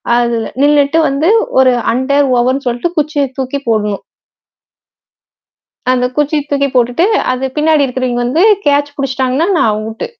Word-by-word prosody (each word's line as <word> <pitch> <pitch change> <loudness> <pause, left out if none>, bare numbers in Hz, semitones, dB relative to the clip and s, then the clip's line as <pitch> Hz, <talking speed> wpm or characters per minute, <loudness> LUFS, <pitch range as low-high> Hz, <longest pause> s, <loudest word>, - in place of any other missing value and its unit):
அதில 235 -2 0 0.2
நின்னுட்டு 290 +1 +3
வந்து 280 +5 0 0.3
ஒரு 260 -1 +5 0.2
அண்டர் 280 +3 +1
ஓவருன்னு 255 +3 0
சொல்ட்டு 245 +9 -2
குச்சிய 300 -1 0
தூக்கி 265 +1 -3
போடணும். 210 -3 -1 1.9
அந்த 250 -1 0
குச்சிய 295 +1 0
தூக்கி 280 -1 +1
போட்டுட்டு, 245 +8 +2 0.3
அது 255 +1 -3
பின்னாடி 305 -1 +2
இருக்கிறவிங்க 250 -1 -2
வந்து 300 +9 +1 0.2
கேட்ச் 285 0 +1
பிடிச்சிட்டாங்கன்னா, 265 +3 -1
நான் 225 - +2
அவுட்டு. 220 +1 -5
265 Hz, 130 wpm, -13 LUFS, 245-290 Hz, 1.9 s, ஒரு